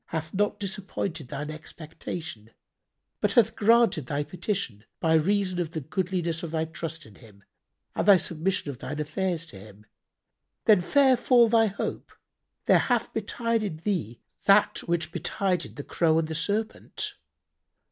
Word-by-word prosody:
hath 160 Hz, 0 st, -4 dB
not 205 Hz, +1 st, 0 dB
disappointed 190 Hz, -6 st, -4 dB
thine 150 Hz, +2 st, -5 dB
expectation, 155 Hz, -6 st, -8 dB, 0.7 s
but 205 Hz, -1 st, +1 dB
hath 225 Hz, -2 st, +4 dB
granted 220 Hz, -, +4 dB
thy 145 Hz, +1 st, -1 dB
petition, 180 Hz, -, -3 dB, 0.2 s
by 160 Hz, -1 st, +2 dB
reason 185 Hz, +3 st, +2 dB
of 165 Hz, -2 st, -4 dB
the 160 Hz, -, -2 dB
goodliness 170 Hz, +1 st, -2 dB
of 170 Hz, -, -5 dB
thy 160 Hz, 0 st, -1 dB
trust 160 Hz, 0 st, -6 dB
in 110 Hz, -, -15 dB
Him 100 Hz, -1 st, -18 dB, 0.5 s
and -, -, -1 dB
thy 200 Hz, -2 st, +9 dB
submission 170 Hz, -1 st, -2 dB
of 125 Hz, -, -11 dB
thine 150 Hz, -, -5 dB
affairs 165 Hz, +2 st, -2 dB
to 105 Hz, -12 st, -11 dB
Him. 105 Hz, +1 st, -14 dB, 0.8 s
Then 210 Hz, -5 st, +6 dB
fair 265 Hz, +7 st, +4 dB
fall 240 Hz, -1 st, +5 dB
thy 225 Hz, -1 st, +5 dB
hope! 200 Hz, -, -4 dB, 0.5 s
There -, -, +6 dB
hath -, -, 0 dB
betided 225 Hz, -, -1 dB
thee 165 Hz, -, -2 dB, 0.3 s
that 200 Hz, +1 st, +5 dB
which 170 Hz, -2 st, 0 dB
betided 190 Hz, -3 st, -1 dB
the 145 Hz, -, -6 dB
Crow 160 Hz, +1 st, +2 dB
and 165 Hz, -1 st, +1 dB
the 160 Hz, -, -4 dB
Serpent." 205 Hz, +7 st, -2 dB
170 Hz, 150 wpm, -27 LUFS, 155-200 Hz, 0.8 s, thy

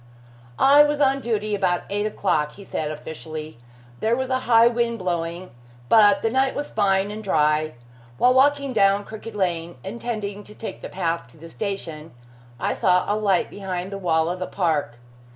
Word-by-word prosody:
"I 280 Hz, +2 st, +7 dB
was 295 Hz, 0 st, +2 dB
on 275 Hz, -1 st, +3 dB
duty 215 Hz, -3 st, -1 dB
about 185 Hz, -3 st, +1 dB
eight 205 Hz, +1 st, -1 dB
o'clock," 155 Hz, -8 st, 0 dB
he 200 Hz, -, -12 dB
said 155 Hz, -5 st, -3 dB
officially. 155 Hz, -1 st, -7 dB, 0.4 s
"There 225 Hz, +2 st, +1 dB
was 260 Hz, +1 st, -3 dB
a 260 Hz, -, +2 dB
high 230 Hz, -1 st, +7 dB
wind 235 Hz, -1 st, +1 dB
blowing, 175 Hz, -1 st, -3 dB, 0.4 s
but 205 Hz, -3 st, +6 dB
the 225 Hz, -, +2 dB
night 265 Hz, +1 st, +1 dB
was 290 Hz, -, -4 dB
fine 200 Hz, -1 st, +1 dB
and 215 Hz, +1 st, -7 dB
dry. 155 Hz, -4 st, +1 dB, 0.4 s
While 250 Hz, -, +4 dB
walking 280 Hz, 0 st, +3 dB
down 200 Hz, -1 st, +3 dB
Crooked 220 Hz, 0 st, -9 dB
Lane, 175 Hz, -3 st, -2 dB
intending 205 Hz, -1 st, -5 dB
to 210 Hz, -, -14 dB
take 225 Hz, -, -7 dB
the -, -, -7 dB
path 170 Hz, -7 st, -2 dB
to 125 Hz, -, -19 dB
the 165 Hz, +2 st, -12 dB
station, 165 Hz, -7 st, -5 dB, 0.5 s
I -, -, 0 dB
saw 180 Hz, 0 st, +2 dB
a -, -, 0 dB
light 200 Hz, -4 st, +1 dB
behind 190 Hz, -1 st, -5 dB
the 200 Hz, -, -5 dB
wall 160 Hz, -3 st, +1 dB
of 180 Hz, +1 st, -3 dB
the 185 Hz, -, -3 dB
park. 155 Hz, -10 st, -1 dB
200 Hz, 180 wpm, -23 LUFS, 170-225 Hz, 0.5 s, I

